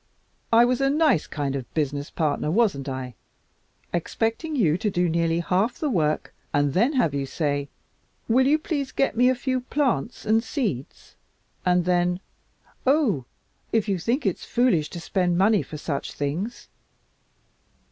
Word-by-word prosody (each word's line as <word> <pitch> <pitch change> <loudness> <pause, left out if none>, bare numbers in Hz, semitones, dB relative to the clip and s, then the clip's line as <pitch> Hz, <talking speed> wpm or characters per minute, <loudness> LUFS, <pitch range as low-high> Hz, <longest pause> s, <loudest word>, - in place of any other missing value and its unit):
I 230 +1 +7
was 250 +1 +1
a 275 - +3
nice 290 - +3
kind 140 -2 -2
of 135 - -1
a - - -40
business 145 -2 -1
partner, 150 -2 -1
wasn't 170 - +1
I? 130 -1 -5 0.8
Expecting 225 - -1
you 170 - +3
to 220 - 0
do 180 -2 +1
nearly 165 0 +1
half 190 +7 0
the 300 -3 -1
work 155 -7 0 0.2
and 145 -1 +2
then 235 - +3
have 240 - +2
you 140 -1 -2
say, 145 -2 -1 0.6
'Will 260 +3 +4
you 300 +2 +4
please 295 -4 -3
get 275 - 0
me 250 +2 +5
a 260 - +2
few 255 0 -1
plants 255 -3 -1
and 220 +1 +3
seeds?' 220 - -4 0.5
and 180 -1 +3
then, 180 0 +1 0.7
'Oh! 255 - +3 0.5
If 225 -2 +1
you 195 -3 0
think 240 - -1
it's 190 - -1
foolish 220 -12 +2
to 175 - -7
spend 175 +1 0
money 205 +2 +4
for 155 - -8
such 145 -2 -4
things.' 160 - -3
185 Hz, 160 wpm, -25 LUFS, 155-250 Hz, 0.8 s, I